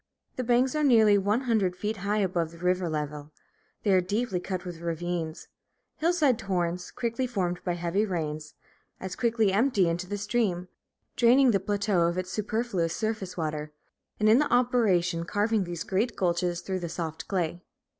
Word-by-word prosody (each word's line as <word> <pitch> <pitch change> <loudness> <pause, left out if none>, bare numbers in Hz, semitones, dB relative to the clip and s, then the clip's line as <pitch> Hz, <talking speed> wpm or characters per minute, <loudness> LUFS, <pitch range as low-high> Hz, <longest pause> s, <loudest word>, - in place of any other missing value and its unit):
The 255 - -2
banks 245 +2 +2
are 305 0 0
nearly 220 -6 +6
one 205 +5 +1
hundred 220 -8 +1
feet 210 +3 -3
high 200 +2 -1
above 175 -4 0
the 170 - -14
river 180 0 0
level. 150 -1 -4 0.5
They 205 - +2
are 185 - +5
deeply 205 +1 -1
cut 185 0 -4
with 175 -2 -7
ravines. 170 -1 -3 0.5
Hillside 310 -7 +2
torrents, 180 -3 -2
quickly 240 +1 -2
formed 180 -7 -2
by 175 - -1
heavy 175 +4 0
rains, 155 -6 -4 0.4
as 190 0 -5
quickly 225 -4 +2
empty 210 -4 +3
into 170 +2 -2
the 205 +2 -3
stream, 195 -4 -1 0.5
draining 250 +2 +5
the 200 - +2
plateau 200 -3 +1
of 170 +1 -2
its 185 0 -3
superfluous 210 -6 -1
surface 215 -5 -3
water, 155 -2 -3 0.5
and 215 - +3
in 220 +4 +6
the 300 - 0
operation 210 -9 +2
carving 205 +3 0
these 175 -2 -4
great 215 +5 -1
gulches 175 -1 0
through 185 +1 -3
the 170 -1 -5
soft 160 -2 -5
clay. 175 -3 -2
190 Hz, 170 wpm, -27 LUFS, 175-225 Hz, 0.5 s, nearly